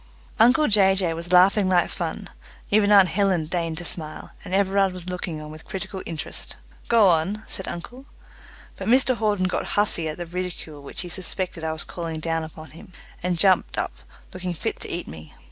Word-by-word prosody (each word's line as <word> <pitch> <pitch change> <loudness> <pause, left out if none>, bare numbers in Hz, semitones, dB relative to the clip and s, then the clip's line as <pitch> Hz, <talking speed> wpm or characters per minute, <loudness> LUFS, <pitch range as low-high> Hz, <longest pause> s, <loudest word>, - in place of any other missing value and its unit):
Uncle 255 +7 +6
Jay 195 -3 +5
Jay 180 -4 +2
was 170 +1 -6
laughing 190 +2 +5
like 180 -1 +3
fun; - - -4 0.4
even 205 0 +4
aunt 195 -3 +7
Helen 185 -3 +1
deigned 165 -1 -2
to 175 - -2
smile; 155 -2 -4
and - - -8
Everard 195 0 +2
was 180 -1 -8
looking 180 -3 -4
on 150 0 -8
with 155 0 -12
critical 190 0 -5
interest. 160 -3 -6 0.3
"Go 230 -4 +5
on," 180 +5 +1
said 190 - -3
uncle. 245 +10 -7 0.7
But 190 - -5
Mr 255 +2 +4
Hawden 205 -4 +1
got 185 - -1
huffy 195 -6 +1
at 155 - -5
the 175 - -4
ridicule 170 -4 -6
which 140 - -4
he 180 - -5
suspected 180 0 -4
I 160 - -1
was 160 0 -3
calling 165 -2 -5
down 165 0 -1
upon 160 0 -10
him, 165 +3 -14 0.3
and 180 0 0
jumped 190 +1 +3
up - - -1 0.4
looking 180 -1 -4
fit - - -3
to - - -5
eat - - -4
me. 80 +1 -10
180 Hz, 195 wpm, -24 LUFS, 165-195 Hz, 0.7 s, aunt